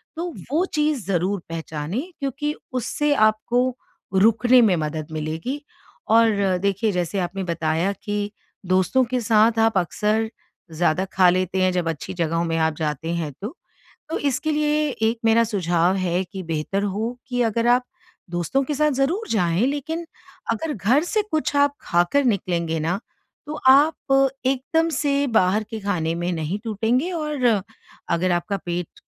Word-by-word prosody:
तो 340 0 -4 0.2
वो 330 +5 +2
चीज़ 300 -6 0
ज़रूर 190 +2 0
पहचानें 160 - -4 0.2
क्योंकि 285 +2 -2 0.2
उससे 290 +4 0
आपको 240 +2 +2 0.4
रुकने 225 +5 +5
में 205 -5 +4
मदद 155 0 -3
मिलेगी 160 - -4 0.5
और 205 -5 +4
देखिए 200 +2 +1
जैसे 180 +1 -1
आपने 185 +2 -3
बताया 170 +1 0
कि 205 0 -2 0.3
दोस्तों 185 +8 +3
के 250 - +1
साथ 225 +1 +3
आप 225 -2 +3
अक्सर 210 +5 0 0.4
ज़्यादा 175 +3 +1
खा 185 -1 +5
लेते 185 +1 0
हैं 185 0 +3
जब 175 -2 0
अच्छी 175 +5 -5
जगहों 165 -1 0
में 165 0 -1
आप 160 -1 +1
जाते 155 +1 -2
हैं 160 -3 -3
तो। 220 - -5 0.6
तो - - -1
इसके 285 +2 -1
लिए 300 0 +1
एक 225 +1 +2
मेरा 225 +1 +5
सुझाव 180 -3 +1
है 180 0 0
कि 190 +1 -8
बेहतर 165 +4 -2
हो 215 +5 -2
कि 245 -1 0
अगर 230 0 0
आप 250 +1 +4 0.5
दोस्तों 175 - 0
के 295 +2 -2
साथ 300 +1 +2
ज़रूर 315 - 0
जाएँ 180 +1 +2
लेकिन 310 +4 -3 0.5
अगर 300 +7 -3
घर 235 - +2
से 425 +4 0
कुछ 310 -2 -1
आप 285 0 +3
खाकर 175 +12 +2
निकलेंगे 170 -7 0
ना 170 +5 0 0.5
तो 300 - -5
आप 270 -1 +4 0.2
एकदम 275 +5 +1
से 280 -1 +1
बाहर 190 +4 +2
के 220 - -5
खाने 175 -5 -1
में 175 +1 -2
नहीं 165 +4 -2
टूटेंगे 230 - 0
और 300 -5 -2 0.6
अगर 180 +1 +1
आपका 175 +3 -1
पेट 175 0 -4
210 Hz, 155 wpm, -23 LUFS, 175-265 Hz, 0.6 s, रुकने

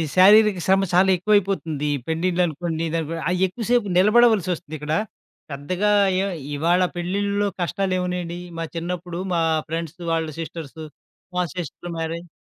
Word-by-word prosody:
శారీరక 205 +1 +6
శ్రమ 195 +1 +4
చాలా 185 +2 +5
ఎక్కువైపోతుంది. 185 -6 0
ఈ - - -2
పెండిండ్లనుకోండి, 165 -1 -1
దానికో 165 0 -2
ఆహ్, 180 +1 +1
ఎక్కువసేపు 230 +2 0
నిలబడవలసొస్తుంది 195 -6 +3
ఇక్కడ. 150 +1 -3 0.6
పెద్దగా 180 +9 -1 0.3
ఏ - - 0 0.3
ఇవాళ 170 +5 +2
పెళ్ళిల్లో 200 +3 -1
కష్టాలేమునాయండి? 180 -1 -2 0.2
మా - - -2
చిన్నప్పుడు, 175 +1 -4
మా 170 - +2 0.3
ఫ్రెండ్స్ 165 +1 -4
వాళ్ళ 165 -1 0
సిస్టర్సు. 160 -1 -7 0.5
మా 180 - +2
సిస్టర్ 175 0 -6
మ్యారేజ్. 165 +2 -4
175 Hz, 120 wpm, -23 LUFS, 165-195 Hz, 0.6 s, శారీరక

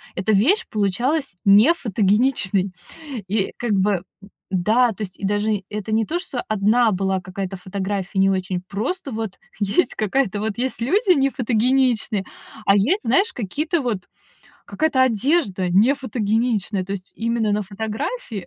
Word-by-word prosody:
эта 195 +4 0
вещь 340 - +3
получалась 235 - 0
нефотогеничной. 205 - +3 0.6
И 200 0 -1
как 240 -3 -2
бы 195 -2 +1 0.5
м-да, 220 +6 +3
то 215 - -11
есть 185 - -8
и 195 - -3
даже 205 0 0
это 210 +1 -5
не 220 0 +2
то, 345 +2 -2
что 260 -9 -4
1 215 +2 +3
была 190 0 0
какая-то 190 +1 -5
фотография 195 +1 -3
не 195 0 +4
очень, 185 -1 -1
просто 260 - -3
вот 220 -3 -5 0.2
есть 205 - +1
какая-то 215 -1 0
вот 215 +1 -3
есть 260 -1 -1
люди 370 - +3
нефотогеничные, 250 -4 +1 0.4
а 195 - +5
есть, 270 - +2
знаешь, 265 - +2
какие-то 295 - -2
вот 215 -8 -3 0.6
какая-то 295 -5 +1
одежда 230 - +1
нефотогеничная. 220 -3 +1
То 195 - -5
есть 195 -1 -7
именно 230 -1 0
на 210 0 0
фотографии 215 - -5
215 Hz, 140 wpm, -21 LUFS, 195-255 Hz, 0.6 s, а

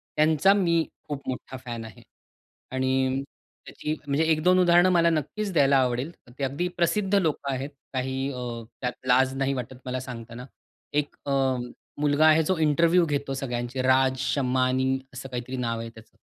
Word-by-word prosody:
त्यांचा 155 +5 +4
मी 170 -5 +2 0.2
खूप 140 -2 -6
मोठा 130 0 -5
फॅन 115 -2 -5
आहे. 110 -3 -12 0.7
आणि 130 +1 0 0.4
त्याची 150 - -4
म्हणजे 140 +3 +2
1-2 180 +4 +4
उदाहरण 175 0 +5
मला 170 -1 +4
नक्कीच 195 +6 -2
द्यायला 140 -3 +4
आवडेल. 130 +3 0 0.3
ते - - -2
अगदी 140 +7 -1
प्रसिद्ध 195 +3 +1
लोकं 155 -7 0
आहेत. 135 +2 -3 0.2
काही 130 +1 -2 0.5
त्यात 125 -1 -1
लाज 130 +1 +4
नाही 135 0 +1
वाटत 125 0 -5
मला 130 0 -2
सांगताना. 120 -1 -8 0.5
एक 145 0 -1
अ, 140 - -2 0.7
मुलगा 145 +1 +3
आहे 155 +1 +5
जो 185 +3 0
इंटरव्ह्यू 165 +4 +4
घेतो 140 -3 -2
सगळ्यांचे 125 -1 -3
राज 130 0 +3
शमानी 130 0 +1
असं 130 +1 -7
काहीतरी 125 +1 -5
नाव 115 -2 -2
आहे 115 0 -5
त्याचं. 110 -1 -17
135 Hz, 155 wpm, -26 LUFS, 130-155 Hz, 0.7 s, उदाहरण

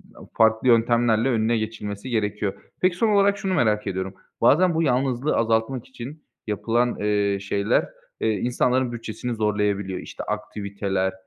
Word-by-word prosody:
aaa, - - -12
farklı 110 +2 +3
yöntemlerle 115 0 +3
önüne 115 -1 +2
geçilmesi 110 0 -5
gerekiyor. 105 -3 -1 0.3
Peki, 185 -1 +3
son 225 +3 +2
olarak 200 -1 +4
şunu 190 -1 -2
merak 110 - +1
ediyorum, 95 0 -3 0.3
bazen 170 +9 +5
bu 165 - +2
yalnızlığı 130 0 +1
azaltmak 115 +2 0
için 130 +4 -9 0.2
yapılan, 120 +3 0
eee, 105 -1 +1
şeyler, 100 +1 0 0.3
eee, 110 - +2
insanların 125 +3 +1
bütçesini 120 +1 -5
zorlayabiliyor. 105 -3 0
İşte, - - -8
aktiviteler 100 -3 -2
110 Hz, 140 wpm, -24 LUFS, 105-125 Hz, 0.3 s, bazen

